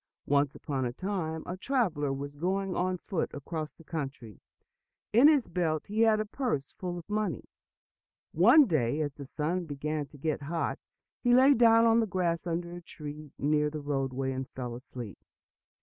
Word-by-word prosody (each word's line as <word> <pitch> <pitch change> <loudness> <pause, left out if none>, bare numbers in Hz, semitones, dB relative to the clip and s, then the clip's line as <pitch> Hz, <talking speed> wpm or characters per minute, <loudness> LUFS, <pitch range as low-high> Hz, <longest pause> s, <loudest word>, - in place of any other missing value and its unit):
Once 140 0 +2
upon 135 -3 -3
a 120 - -1
time, 160 -1 -3
a 180 - -4
traveler 185 - 0
was 140 +1 -4
going 190 +4 -1
on 185 0 0
foot 175 -1 -2
across 155 +2 -5
the 165 - -16
country. 140 - -6 0.7
In 245 +6 +8
his 295 -5 +4
belt 160 -4 -1
he 215 +2 -1
had 220 -1 +5
a 215 - 0
purse 210 - -2
full 180 -1 -5
of 170 - -9
money. 210 - -1 0.9
One 240 - +7
day, 150 - +1
as 145 -2 -2
the 140 -1 -9
sun 165 +6 -2
began 150 0 -3
to 145 - -15
get 155 +1 -2
hot, 165 +4 -2 0.4
he 245 -1 +4
lay 265 +3 +7
down 230 -2 +6
on 230 0 +5
the 225 - +1
grass 175 -3 -1
under 170 +1 -2
a 175 - -8
tree 150 -2 -9
near 150 +1 +2
the 155 0 -5
roadway, 135 -2 -2
and 130 0 -4
fell 125 -2 -5
asleep. 120 -3 -8
160 Hz, 180 wpm, -30 LUFS, 145-195 Hz, 0.9 s, In